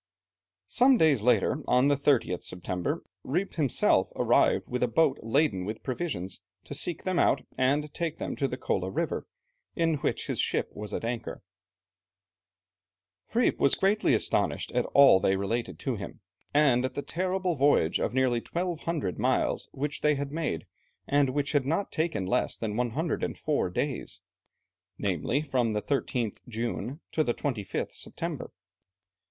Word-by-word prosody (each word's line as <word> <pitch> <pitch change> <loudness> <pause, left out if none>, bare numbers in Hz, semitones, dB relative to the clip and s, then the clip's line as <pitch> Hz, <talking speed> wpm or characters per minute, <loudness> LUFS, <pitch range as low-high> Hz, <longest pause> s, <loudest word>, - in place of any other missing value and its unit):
Some 255 +1 +4
days 150 - +4
later, 120 +3 +3
on 125 +2 +4
the 145 - +4
30th 135 -10 +1
September, 90 0 -3 0.2
Rijp 180 +8 -1
himself 145 -7 +3
arrived - - +3
with 125 0 -3
a 125 - +3
boat 135 +3 +2
laden 115 -5 +1
with 105 +4 -5
provisions, 120 - -4 0.2
to - - -8
seek 165 +3 -1
them 185 -2 0
out - - +3
and 145 +3 +1
take 165 -2 -3
them - - -4
to 140 - +1
the 125 - -5
Kola 95 -6 -1
River, 95 - -2 0.5
in 165 -2 +1
which - - -1
his - - -2
ship - - 0
was 105 0 -7
at 115 - -3
anchor. 120 -4 -4 1.9
Rijp - - +2
was 140 - +3
greatly 195 - +3
astonished - - 0
at - - 0
all 140 -9 +8
that - - +1
they 95 - +3
related 100 -2 -2
to - - -2
him, - - -8 0.3
and 140 -4 +4
at 130 0 -3
the 145 - -3
terrible 185 0 -1
voyage 135 - +3
of - - 0
nearly 125 -1 +2
1200 165 - -3
miles - - 0
which 145 +1 -3
they 150 0 +3
had 140 0 -4
made, 160 0 -2 0.4
and 145 -1 +3
which 140 +1 -1
had 140 -3 +1
not 165 +7 0
taken 155 - -1
less 95 - 0
than 105 -2 -3
104 140 - -1
days 135 +9 -3 0.8
namely, 100 - 0
from 125 -6 0
the 105 - 0
13th 125 -3 -1
June 120 +5 -4
to 155 - +2
the 120 -4 -1
25th 115 -9 -3
September. - - -5
135 Hz, 155 wpm, -28 LUFS, 115-155 Hz, 1.9 s, all